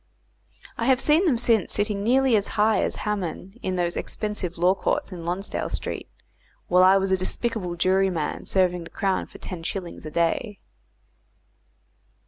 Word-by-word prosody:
I 230 - 0
have 260 -1 +4
seen 310 +7 +3
them 265 -7 +3
since 230 -5 +2
sitting 205 -1 0
nearly 255 +3 +3
as 205 -1 +1
high 215 +1 +4
as - - -1
Haman 195 +1 -4
in 185 - -2
those 175 -1 0
expensive 205 -5 -3
Law 180 +2 +4
courts 195 - -1
in 170 -2 -7
Lonsdale 180 +4 -3
Street, - - -4 0.6
while 180 +1 +4
I 190 +1 +7
was 195 0 0
a 190 - +4
despicable 185 -1 -2
jury 190 +2 +2
man 165 -5 -3
serving 180 -2 +1
the - - -10
Crown 195 -3 -1
for - - -13
ten 180 -3 -7
shillings 175 +1 -5
a 155 - -6
day. 170 +6 -1
195 Hz, 165 wpm, -25 LUFS, 180-215 Hz, 0.6 s, I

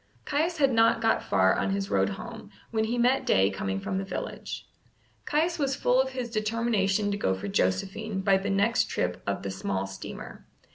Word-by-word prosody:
Caius 320 +4 0
had 275 -4 +3
not 225 0 +4
got 225 -1 +2
far 95 0 +3
on - - 0
his 195 0 -2
road - - +3
home, 225 -1 -9 0.2
when 220 -1 +1
he 235 +2 -1
met 250 +3 +3
Day 95 +1 +3
coming 95 0 -2
from 190 - -2
the - - -2
village. 195 - -6 0.6
Caius 330 +3 +1
was 275 -2 +1
full 250 +1 +3
of 265 - -2
his 250 -3 -4
determination 215 -2 +1
to 200 - -1
go 95 - +1
for 95 - -6
Josephine 190 - -1
by 195 0 +4
the 195 - -3
next 200 +4 +2
trip - - -2
of - - -2
the 100 - -3
small 95 0 -2
steamer. 95 0 -9
215 Hz, 195 wpm, -28 LUFS, 190-240 Hz, 0.6 s, not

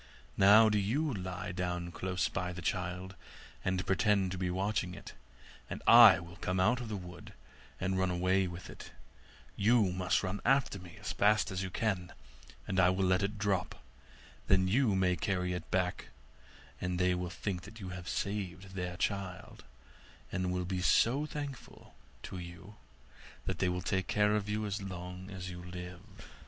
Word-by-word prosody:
Now 105 +3 +7
do 105 -1 +2
you 135 +9 0
lie 90 -3 -4
down 90 -1 -3
close 90 +1 -1
by 90 0 -3
the 90 - -7
child, 90 +2 -2 0.5
and 95 0 -1
pretend 95 -1 +2
to 95 - -4
be 90 -1 0
watching 95 0 -1
it, - - -10 0.6
and - - -6
I 115 -5 +9
will 85 0 -11
come 90 0 -1
out 120 +7 +3
of 120 - -6
the 105 - -3
wood 90 -2 -10 0.5
and 95 0 0
run 95 0 +2
away 90 +2 +2
with 85 0 -8
it; - - -11 0.6
you 105 -2 +3
must 90 +1 +1
run 95 +2 -3
after 135 -7 +2
me 90 -2 -12
as - - -4
fast 105 0 +3
as 95 0 -2
you 95 - -3
can, 90 -3 -1 0.6
and 95 -2 0
I 90 -1 +6
will 95 +1 +1
let 90 +1 +3
it 100 +2 -2
drop; 100 -2 -1 0.7
then 95 -1 +4
you 110 +1 +3
may 90 -1 +2
carry 90 -1 -1
it 80 -4 -6
back, 90 0 -1 0.7
and 90 0 -1
they 90 0 +3
will 90 0 -2
think 95 +3 -5
you 95 -3 -6
have 90 -1 -7
saved 95 -2 -3
their 90 -2 -4
child, 95 -2 -3 0.7
and 90 -1 -1
will 90 0 -1
be 90 0 -2
so 130 +10 +3
thankful 145 -4 -8 0.3
to 95 - -6
you 90 +4 -10 0.7
that - - -3
they 95 - +2
will 90 0 -2
take 95 -2 -1
care 105 0 +3
of 105 -1 -2
you 105 +1 -1
as 100 0 -3
long 90 0 -7
as 95 -2 -6
you 90 0 -8
live. 90 +2 -9
95 Hz, 175 wpm, -32 LUFS, 90-100 Hz, 0.7 s, I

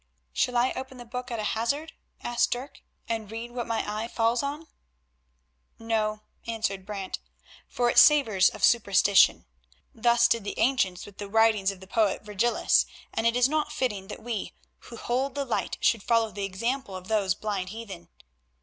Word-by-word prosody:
"Shall 245 - +1
I 245 +2 +3
open 260 0 -7
the 245 - -10
Book 250 +2 -6
at 235 - -3
a 215 - -3
hazard," 280 +8 -2 0.3
asked 240 0 +1
Dirk, 255 +4 -5 0.3
"and 225 -3 -3
read 230 +2 -6
what 240 -1 -4
my 230 -1 -1
eye 215 +2 -3
falls 230 0 +1
on?" 290 +3 -4 1.1
"No," 215 -2 -1 0.2
answered 200 -4 -3
Brant, 200 -3 -5 0.5
"for 245 - 0
it - - +5
savours 220 -11 +6
of 215 - -10
superstition; 200 -3 +4 0.5
thus 235 +1 +4
did 230 -3 +1
the 205 - -5
ancients 195 -9 +1
with 205 -1 -15
the 205 -1 -6
writings 220 -2 +3
of 195 -2 -6
the - - -10
poet 205 -1 +1
Virgilius, 210 +3 +2 0.3
and 225 +1 +1
it 230 - +2
is 245 0 +4
not 305 +1 -1
fitting 205 -7 -2
that - - -9
we 230 -3 -4 0.3
who 235 - -10
hold 260 +4 -2
the 280 -1 -2
light 240 - -2
should 230 - +3
follow 230 0 +1
the 200 -1 -4
example 230 +3 -3
of 185 0 -8
those 200 -4 +1
blind 200 -4 -3
heathen. 195 -5 -9
225 Hz, 175 wpm, -27 LUFS, 205-240 Hz, 1.1 s, savours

